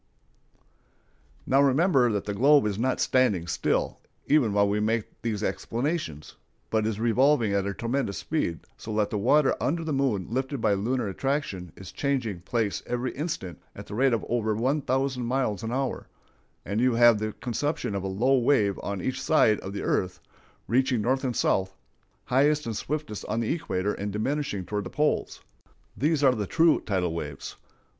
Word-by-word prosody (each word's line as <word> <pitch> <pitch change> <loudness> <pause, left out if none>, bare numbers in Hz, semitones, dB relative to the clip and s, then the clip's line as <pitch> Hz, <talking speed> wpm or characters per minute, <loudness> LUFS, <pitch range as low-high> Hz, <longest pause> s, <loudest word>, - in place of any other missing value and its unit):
Now 135 +1 +4
remember 140 -2 +3
that 100 -2 -2
the 105 - -3
globe 140 +5 +5
is 105 -1 -2
not 130 +2 0
standing 105 -10 +2
still, 85 - -1 0.3
even 140 -7 +3
while 100 0 +3
we 105 +1 0
make 110 +1 -2
these 110 -3 -2
explanations, 120 - -3 0.3
but 110 -1 +1
is 110 -2 -2
revolving 120 -1 +3
at 100 0 0
a 100 - -2
tremendous 120 -3 -2
speed, 115 - -2 0.2
so 110 -1 -6
that 105 -1 +1
the 105 - -1
water 135 +6 +3
under 165 +3 0
the 160 -2 -2
moon 130 -9 0
lifted 130 +3 -2
by 110 -2 +2
lunar 115 +4 -1
attraction 100 - -3
is 95 - -10
changing 125 -10 -2
place 110 +2 -1
every 125 +1 -2
instant 150 - -5
at - - -9
the - - -9
rate 130 +5 +3
of 115 - -1
over 110 -2 0
one 130 +7 0
thousand 130 -1 -1
miles 125 -6 -1
an 115 - -4
hour, 135 +1 -2 0.6
and 100 +4 -1
you 125 -1 +3
have 120 -2 +6
the 110 0 -3
conception 130 -1 -2
of 100 - -2
a 95 - -3
low 125 +8 +2
wave 110 -6 +2
on 100 -3 -4
each 130 0 -2
side 110 -9 +3
of 95 - -7
the 100 - -5
earth, 90 0 -1 0.5
reaching 130 -2 +1
north 130 +4 +1
and 125 -3 -1
south, 95 -1 +1 0.5
highest 145 +4 +2
and 115 -2 -3
swiftest 145 -4 -4
on 110 +2 -2
the 115 +3 0
equator 105 - -2
and 100 +1 -4
diminishing 110 -2 -2
toward 105 +3 -3
the 90 - -7
poles. 150 0 -1 0.5
These 150 +1 +1
are 130 -2 +6
the 105 -5 -3
true 165 - +3
tidal 90 -4 -1
waves. 75 -4 -6
115 Hz, 180 wpm, -26 LUFS, 100-135 Hz, 0.6 s, have